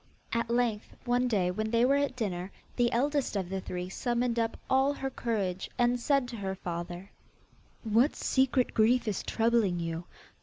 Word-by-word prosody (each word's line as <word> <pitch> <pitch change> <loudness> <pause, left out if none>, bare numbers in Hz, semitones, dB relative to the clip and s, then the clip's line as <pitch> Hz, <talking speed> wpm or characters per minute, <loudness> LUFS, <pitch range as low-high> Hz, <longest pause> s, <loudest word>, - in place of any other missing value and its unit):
At 230 0 0
length 235 -3 0
one 245 +1 +2
day 190 -6 +1
when 215 +4 -2
they 230 +1 +3
were 270 - +4
at 285 -2 0
dinner, 190 -5 -3 0.2
the 240 -1 +2
eldest 280 +1 0
of 190 -3 -2
the 190 0 -3
three 180 0 -4
summoned 240 +4 -1
up 225 0 -1
all 265 +2 +3
her 270 -1 -3
courage 200 -7 -2
and 245 0 +2
said 275 0 +2
to 235 - -6
her 190 -2 -3
father: 175 +1 -6 0.7
'What 230 +6 +3
secret 260 -1 +1
grief 230 +2 +3
is 210 - -1
troubling 225 -6 +1
you? 165 0 -3
230 Hz, 175 wpm, -30 LUFS, 190-245 Hz, 0.7 s, were